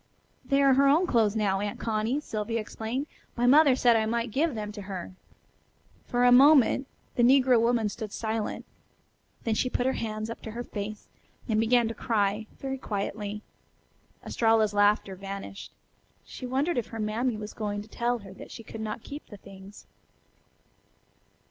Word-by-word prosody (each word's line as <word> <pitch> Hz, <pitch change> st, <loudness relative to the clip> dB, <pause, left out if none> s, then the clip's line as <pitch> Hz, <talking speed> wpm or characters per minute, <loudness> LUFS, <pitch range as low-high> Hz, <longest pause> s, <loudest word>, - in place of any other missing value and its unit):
"They 275 Hz, +2 st, +2 dB
are 275 Hz, -1 st, +6 dB
her 275 Hz, +2 st, +4 dB
own 310 Hz, +6 st, +4 dB
clothes 225 Hz, -, +2 dB
now, 200 Hz, -3 st, +1 dB
Aunt 205 Hz, 0 st, -4 dB
Connie," 225 Hz, +4 st, -1 dB
Sylvia 225 Hz, -3 st, -3 dB
explained. 225 Hz, +5 st, -4 dB, 0.3 s
"My 240 Hz, -, +1 dB
mother 280 Hz, +1 st, +6 dB
said 240 Hz, -2 st, +4 dB
I 220 Hz, -1 st, +2 dB
might 230 Hz, 0 st, -1 dB
give 290 Hz, +3 st, 0 dB
them 210 Hz, -1 st, -4 dB
to 210 Hz, -1 st, -8 dB
her." 190 Hz, -2 st, -6 dB, 1.0 s
For 245 Hz, 0 st, +1 dB
a 245 Hz, -, +6 dB
moment 270 Hz, 0 st, +6 dB, 0.3 s
the -, -, 0 dB
negro 250 Hz, -1 st, +5 dB
woman 230 Hz, -2 st, +2 dB
stood 210 Hz, 0 st, -6 dB
silent. 220 Hz, 0 st, -3 dB, 0.8 s
Then 225 Hz, -, 0 dB
she 255 Hz, +4 st, 0 dB
put 245 Hz, -, -1 dB
her 265 Hz, -, +2 dB
hands 215 Hz, 0 st, -4 dB
up -, -, -8 dB
to -, -, -7 dB
her 240 Hz, +1 st, -4 dB
face 210 Hz, -1 st, -6 dB, 0.4 s
and 220 Hz, -3 st, +1 dB
began 235 Hz, +1 st, +3 dB
to 225 Hz, -, -3 dB
cry, 210 Hz, -1 st, 0 dB
very 270 Hz, -1 st, -4 dB
quietly. 210 Hz, -1 st, -4 dB, 0.8 s
Estralla's 225 Hz, -2 st, +2 dB
laughter 205 Hz, -1 st, +2 dB
vanished. 195 Hz, +1 st, -7 dB, 0.5 s
She 255 Hz, -, -8 dB
wondered 270 Hz, +4 st, 0 dB
if 235 Hz, -, -5 dB
her 225 Hz, -, -7 dB
mammy 220 Hz, +2 st, -1 dB
was 210 Hz, 0 st, -7 dB
going 205 Hz, -1 st, -3 dB
to -, -, -16 dB
tell 240 Hz, +2 st, -1 dB
her 190 Hz, -, -10 dB
that -, -, -11 dB
she 230 Hz, -, -9 dB
could 220 Hz, 0 st, -8 dB
not 215 Hz, +1 st, -5 dB
keep 290 Hz, +2 st, -9 dB
the 205 Hz, -, -11 dB
things. 195 Hz, +1 st, -13 dB
225 Hz, 175 wpm, -28 LUFS, 210-250 Hz, 1.0 s, are